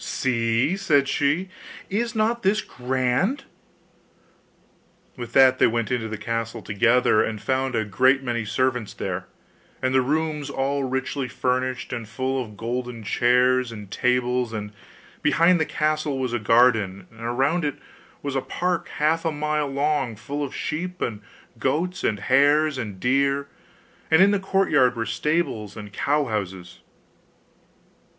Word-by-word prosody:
'See,' 115 +4 0
said 150 -8 +2
she, 145 +6 +1 0.4
'is 230 +4 -2
not 225 +2 +1
this 210 +1 +2
grand?' 130 - -1 1.7
With 120 -3 -8
that 130 -1 +6
they - - +6
went 115 0 -1
into 120 -3 -1
the 110 0 -5
castle 115 +1 -4
together, 115 +2 +3
and 110 -1 -3
found 130 +4 -1
a 110 - 0
great 130 +7 +3
many 120 -3 -2
servants 125 0 -1
there, - - -4 0.5
and 130 0 0
the 130 - +4
rooms 150 +1 -1
all 140 +1 -1
richly 130 +1 -2
furnished, 130 +1 -2
and 115 -3 -5
full 130 +3 -2
of 105 -3 -13
golden 120 0 -4
chairs 125 +2 +2
and 105 -3 -9
tables; 125 -1 +1
and 105 -1 -5 0.5
behind 170 +4 +4
the 160 - +2
castle 155 -2 -1
was 130 -2 -2
a 120 - 0
garden, 110 -4 +3
and 115 0 -15
around 135 +9 0
it 145 -1 -1 0.5
was 140 -1 -3
a 135 - +1
park 175 +6 -2
half 160 +2 +2
a 165 - 0
mile 150 0 -1
long, 140 -3 0
full 145 +7 -4
of 140 - -5
sheep, 180 +4 -4
and 105 -3 -3 0.4
goats, 160 +9 -1
and 105 -2 0
hares, 145 +2 +3
and 105 -6 -5
deer; 140 +4 +1 0.6
and 160 - +5
in 200 - +5
the 205 - +1
courtyard 170 -10 +2
were 115 -1 -2
stables 135 - -1
and 105 -1 -9
cow 145 +5 +1
houses. 95 -5 -5
130 Hz, 150 wpm, -24 LUFS, 115-150 Hz, 1.7 s, that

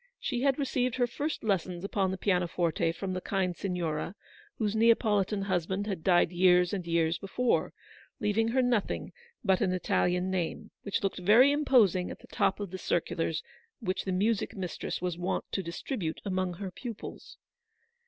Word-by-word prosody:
She 245 - -2
had 275 -1 +3
received 255 -3 0
her 245 - +2
first 290 +6 -3
lessons 185 -4 -1
upon 200 -1 0
the 190 - -3
pianoforte 175 -3 +1
from 185 +2 -4
the 185 - -3
kind 185 -2 -1
Signora, 175 -2 -2 0.4
whose 215 -1 0
Neapolitan 215 -3 +3
husband 190 +1 -1
had 195 -6 -4
died 175 -2 +4
years 180 0 +4
and 185 -4 -3
years 165 -1 +1
before, 235 +5 0 0.5
leaving 210 +2 +1
her 255 +3 +2
nothing 240 -5 0 0.3
but 190 -4 +3
an 190 -3 +2
Italian 180 0 +1
name, 180 -3 -3
which 200 - -2
looked 195 -1 -1
very 225 +9 +6
impos 250 - +4
ing 180 -1 -1
at - - -7
the - - -16
top 195 -1 0
of 200 -4 -5
the 185 - -6
circulars 165 -2 -1 0.4
which 190 -5 -2
the 190 - -1
music 205 +4 0
mistress 180 -1 -4
was 175 -1 -2
wont 180 - -1
to 195 - -1
distribute 170 +1 -4
amongst 185 -3 -1
her 190 -2 -4
pupils. 240 - -8
190 Hz, 170 wpm, -30 LUFS, 180-215 Hz, 0.5 s, very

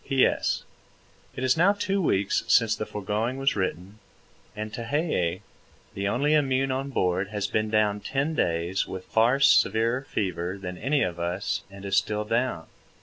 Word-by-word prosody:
P.S. 135 -1 +1 0.7
It 125 - -4
is 130 0 +3
now 185 +5 +4
two 200 -1 -1
weeks 100 - +1
since 115 -2 +4
the 110 - -5
foregoing 105 +5 -2
was 135 0 +1
written, 95 +1 -3 0.6
and 110 0 -5
Tehei, 115 - -1 0.5
the 100 0 -2
only 140 +8 +1
immune 135 -3 +2
on 135 +1 -2
board 95 -6 0
has 105 -1 -3
been 110 +1 -1
down 105 -1 +2
ten 140 +8 -1
days 85 - 0
with 95 -1 -7
far 115 +5 +3
severer 115 -2 +4
fever 95 -7 -3
than 90 -1 -6
any 140 +1 +1
of 85 -1 -3
us 90 +4 -2
and 100 0 -11
is 95 0 +1
still 105 +2 0
down. 115 -7 -1
110 Hz, 160 wpm, -26 LUFS, 95-130 Hz, 0.7 s, now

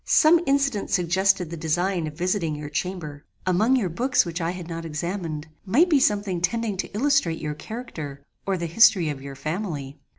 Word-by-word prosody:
Some 330 +2 +5
incident 275 -6 +1
suggested 180 0 +2
the 170 - -5
design 170 +2 0
of 150 - -7
visiting 180 -3 0
your 150 0 -6
chamber. 155 -2 -4 0.2
Among 210 +8 +3
your 230 -7 +1
books 245 +9 +2
which 170 0 -4
I 165 - 0
had 180 -1 -6
not 165 -1 -5
examined, 165 -1 -4 0.2
might 295 - +3
be 295 - +5
something 200 -7 +1
tending 225 +2 0
to - - -4
illustrate 265 - +2
your 150 -1 -4
character, 155 - -7 0.2
or 195 -1 +1
the 170 - -3
history 170 -1 +5
of 140 -2 -5
your 140 0 -8
family. 155 -3 -4
180 Hz, 185 wpm, -24 LUFS, 160-210 Hz, 0.2 s, Some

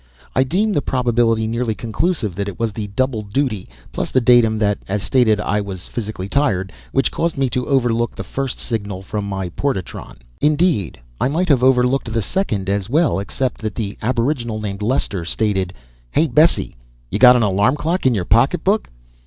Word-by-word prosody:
I 130 - +4
deem 200 +10 0
the 145 - +1
probability 120 -4 +1
nearly 115 0 -1
conclusive 115 - -1
that 100 +3 -3
it 100 - -6
was 115 -2 -1
the 105 -1 -4
double 120 +2 -1
duty, 105 - -2 0.2
plus - - -3
the 130 - +3
datum 120 -3 +4
that, 105 -1 +1
as 100 0 -2
stated, 110 +2 +3
"I" 105 0 0
was 95 -3 -7
physically 105 -4 -5
tired, 100 -8 0 0.2
which 135 - +1
caused 165 -2 -1
me 135 -2 0
to 125 -1 -1
overlook 120 -4 +1
the - - -5
first 135 -2 -4
signal 100 -5 -4
from 100 0 -4
my 95 -2 -3
portatron. 100 -5 -4 0.2
Indeed, 150 - +1 0.2
I - - +2
might 165 +6 0
have 135 -5 +4
overlooked 125 -1 +3
the 115 0 0
second 105 - -2
as 100 +1 -1
well 150 - +2
except 125 +6 -3
that 110 -3 -4
the 105 -3 -3
aboriginal 120 -1 -1
named 100 -1 -5
Lester 105 -5 -1
stated: 95 0 -1 0.4
"Hey, 155 - +2
Bessie. 155 - +2 0.3
Ya 105 - -1
got 125 +1 +8
an 120 - +3
alarm 105 +5 +2
clock 165 +1 0
in 125 - +3
ya 95 - 0
pocketbook?" - - +2
115 Hz, 185 wpm, -19 LUFS, 100-130 Hz, 0.4 s, got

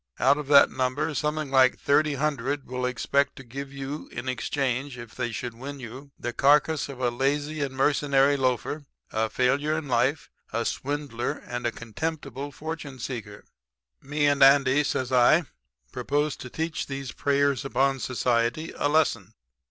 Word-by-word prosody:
Out 145 - +4
of 150 - -6
that 140 -1 +7
number 130 +4 -1
something 150 -1 -2
like 130 -1 +5
thirty 145 +1 +2
hundred 140 -1 -1
will 125 0 -2
expect 140 +3 0
to 135 - -10
give 135 +3 -7
you 140 +2 -6
in 130 - -6
exchange, 130 +1 -2
if 120 -2 -10
they 120 -2 -3
should 120 +1 -5
win 135 +4 -8
you, 130 +3 -9
the 120 - -4
carcass 145 +3 +3
of 135 -2 -8
a 125 -2 +1
lazy 145 +4 -1
and 135 -2 -2
mercenary 140 0 +3
loafer, 135 +2 -1 0.2
a 110 0 0
failure 140 +6 +1
in 160 -2 -5
life, 130 +4 0 0.2
a 115 +1 -1
swindler 140 -4 -2
and 120 -1 -2
contemptible 140 +3 -5
fortune 155 -2 -6
seeker. 115 -5 -6 0.6
"'Me 145 +1 -1
and 145 -1 +2
Andy,' 135 +1 +6
says 130 -3 -2
I, 130 +7 +5 0.5
'propose 145 +1 -1
to 125 - -8
teach 160 +4 -3
these 135 -2 -5
preyers 140 -2 +1
upon 135 0 +1
society 125 +4 0
a 145 - +1
lesson. 115 -9 +1
135 Hz, 160 wpm, -26 LUFS, 125-145 Hz, 0.6 s, that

